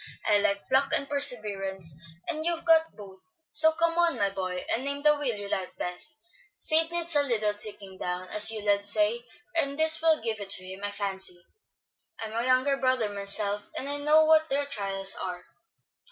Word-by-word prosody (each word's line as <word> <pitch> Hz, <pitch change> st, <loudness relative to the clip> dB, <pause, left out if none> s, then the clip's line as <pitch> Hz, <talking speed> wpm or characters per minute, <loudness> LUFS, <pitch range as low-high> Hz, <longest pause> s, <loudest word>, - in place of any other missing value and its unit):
I 210 Hz, -1 st, +4 dB
like 200 Hz, -1 st, -1 dB
pluck 270 Hz, +1 st, +1 dB
and 275 Hz, -, 0 dB
perseverance, 200 Hz, -, 0 dB, 0.3 s
and 315 Hz, -2 st, -3 dB
you've 335 Hz, 0 st, -2 dB
got 325 Hz, -1 st, +3 dB
both; 195 Hz, -2 st, -13 dB, 0.3 s
so 315 Hz, +1 st, +6 dB
come 335 Hz, +1 st, 0 dB
on, 340 Hz, -6 st, +2 dB
my 200 Hz, -2 st, 0 dB
boy, 185 Hz, -2 st, -4 dB
and 240 Hz, -, -1 dB
name 280 Hz, +1 st, -4 dB
the 300 Hz, 0 st, +5 dB
wheel 280 Hz, -6 st, -2 dB
you 205 Hz, -1 st, -7 dB
like 190 Hz, -2 st, -4 dB
best. 180 Hz, +13 st, -3 dB, 0.4 s
Sid 325 Hz, -4 st, +1 dB
needs 340 Hz, -1 st, +1 dB
a 290 Hz, -, +5 dB
little 220 Hz, -6 st, 0 dB
taking 205 Hz, -2 st, -7 dB
down, 180 Hz, +1 st, -4 dB
as 210 Hz, +1 st, +5 dB
you 220 Hz, -2 st, -4 dB
lads 205 Hz, 0 st, +2 dB
say, 215 Hz, +3 st, 0 dB, 0.3 s
and 280 Hz, -4 st, -1 dB
this 315 Hz, 0 st, +6 dB
will 325 Hz, -1 st, +3 dB
give 225 Hz, -1 st, -3 dB
it 200 Hz, -1 st, -7 dB
to 185 Hz, -1 st, -1 dB
him, 190 Hz, +2 st, -9 dB
I 205 Hz, -, -2 dB
fancy. 190 Hz, -3 st, 0 dB, 0.7 s
I'm 220 Hz, -1 st, -6 dB
a 230 Hz, +1 st, -1 dB
younger 255 Hz, +2 st, +2 dB
brother 255 Hz, -5 st, +1 dB
myself, 200 Hz, 0 st, -3 dB
and 270 Hz, -, -4 dB
I 285 Hz, 0 st, -2 dB
know 305 Hz, +2 st, +4 dB
what 315 Hz, 0 st, +4 dB
their 285 Hz, +1 st, 0 dB
trials 195 Hz, -7 st, -3 dB
are." 180 Hz, -1 st, -6 dB
225 Hz, 195 wpm, -27 LUFS, 200-290 Hz, 0.7 s, so